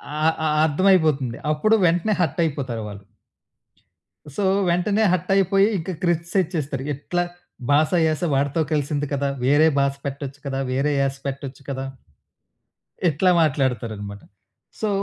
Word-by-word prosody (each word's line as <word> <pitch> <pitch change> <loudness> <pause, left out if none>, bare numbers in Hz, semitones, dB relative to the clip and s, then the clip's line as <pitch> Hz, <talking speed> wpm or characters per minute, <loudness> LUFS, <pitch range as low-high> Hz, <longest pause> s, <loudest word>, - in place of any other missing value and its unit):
ఆ! - - -3 0.3
అ - - +2 0.2
అర్థమైపోతుంది. 155 -7 +2 0.2
అప్పుడు 215 +9 +3
వెంటనే 175 +5 +2
హర్టయిపోతారు 140 -8 -1
వాళ్ళు. 100 0 -10 1.3
సో, 205 - -1 0.3
వెంటనే 200 +5 +1
హర్టయిపోయి 195 +2 +3
ఇంక 180 +2 -4
క్రిటిసైజ్ 175 +1 +1
చేస్తారు. 135 -3 -3
ఎట్లా 175 +6 -2 0.5
బాస, 150 +2 +3 0.2
యాస 155 -1 -1
వాడితో 140 +4 +1
కలిసింది 145 -1 -1
కదా! 140 0 0 0.2
వేరే 145 +4 +5
బాస 140 0 +2
పెట్టొచ్చు 140 0 -5
కదా! 135 -1 -2
వేరే 135 +3 +1
యాస 135 0 0
పెట్టొచ్చు 135 0 -6
కదా! 135 -1 -3 1.2
ఇట్లా 175 +5 +2
మాట్లాడతారనమాట. 115 -9 -1 0.6
సో, 215 - +1
145 Hz, 120 wpm, -22 LUFS, 135-175 Hz, 1.3 s, వేరే